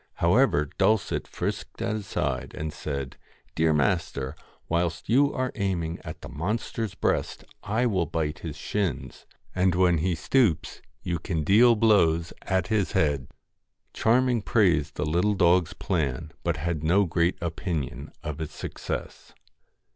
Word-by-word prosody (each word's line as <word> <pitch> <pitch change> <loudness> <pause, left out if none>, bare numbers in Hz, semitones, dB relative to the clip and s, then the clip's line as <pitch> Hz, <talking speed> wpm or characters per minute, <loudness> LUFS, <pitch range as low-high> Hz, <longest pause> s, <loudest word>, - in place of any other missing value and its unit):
However, 85 - +3
Dulcet 110 -1 +2
frisked - - -4
at - - -1
his 105 -2 -4
side, - - -2
and 75 0 -4
said 70 -4 -5 0.4
'Dear 80 0 +2
master, 75 -4 0 0.3
whilst 85 0 -1
you 140 +5 +4
are 130 -1 -2
aiming 85 -5 -2
at - - -8
the - - -8
monster's 105 +6 -3
breast - - -1 0.2
I 110 +4 0
will 95 -8 +1
bite 80 -1 -2
his 80 -4 -6
shins, 90 -11 -3 0.3
and 95 -1 +2
when 90 -2 +3
he 90 +2 +1
stoops 110 - +1 0.2
you 85 -2 -2
can 80 -1 -2
deal 115 +8 +6
blows 85 -7 +3
at 95 -1 0
his 105 -3 0
head.' 70 -4 +1 0.7
Charming 120 0 +2
praised 85 -10 +2
the 75 - -1
little 90 +7 +1
dog's 90 -2 +3
plan, 75 -3 -2
but 85 -3 0
had 80 0 -2
no 95 +6 +4
great 85 +1 +1
opinion 85 -4 -4
of 75 -1 -5
its 80 - -6
success. - - -6
85 Hz, 145 wpm, -26 LUFS, 80-105 Hz, 0.7 s, deal